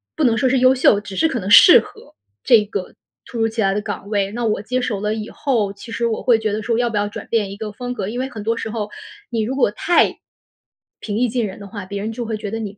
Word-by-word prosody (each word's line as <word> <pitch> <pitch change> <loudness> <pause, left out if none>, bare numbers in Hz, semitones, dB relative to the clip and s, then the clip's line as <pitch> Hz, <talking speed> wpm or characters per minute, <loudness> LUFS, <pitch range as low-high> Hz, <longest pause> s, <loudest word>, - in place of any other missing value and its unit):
不 315 - -1
能 235 -3 +4
说 255 +3 +2
是 265 - +2
优 255 +1 +5
秀， 250 -5 +4
只 200 -2 -9
是 320 - +3
可 255 -7 -2
能 190 +1 -5
适 - - +9
合， - - -15 0.3
这 225 -3 +5
个 200 -3 -6 0.3
突 240 - -8
如 225 0 +2
其 225 0 -3
来 195 -1 +2
的 210 - -1
岗 205 -1 -6
位。 200 -2 0
那 235 +1 -3
我 210 -2 0
接 250 +4 -2
手 210 -5 -2
了 210 0 -1
以 215 -1 -5
后， 220 -8 -1
其 215 +3 -12
实 235 +1 -1
我 225 - -3
会 235 -3 +4
觉 215 -2 -2
得 215 - -3
说 230 0 0
要 240 -1 +1
不 220 - -5
要 205 0 0
转 - - -8
变 210 -4 0
一 200 - -8
个 210 -1 -6
风 245 +2 -5
格。 195 -6 -4
因 230 +4 -5
为 260 +1 -2
很 220 -5 -8
多 230 +1 0
时 225 - -5
候 215 -2 -4 0.4
你 230 -2 -1
如 255 +5 -3
果 245 -6 +3
太， 345 +10 +2 0.8
平 210 -1 -3
易 250 +1 +2
近 235 -1 -1
人 195 +1 -7
的 200 - -9
话， 205 -2 -8
别 200 +1 -5
人 220 +2 -4
就 240 +1 -5
会 220 -1 -3
觉 210 -1 -6
得 225 +1 -4
你， 205 -2 -6
220 Hz, 315 characters per minute, -20 LUFS, 205-240 Hz, 0.8 s, 适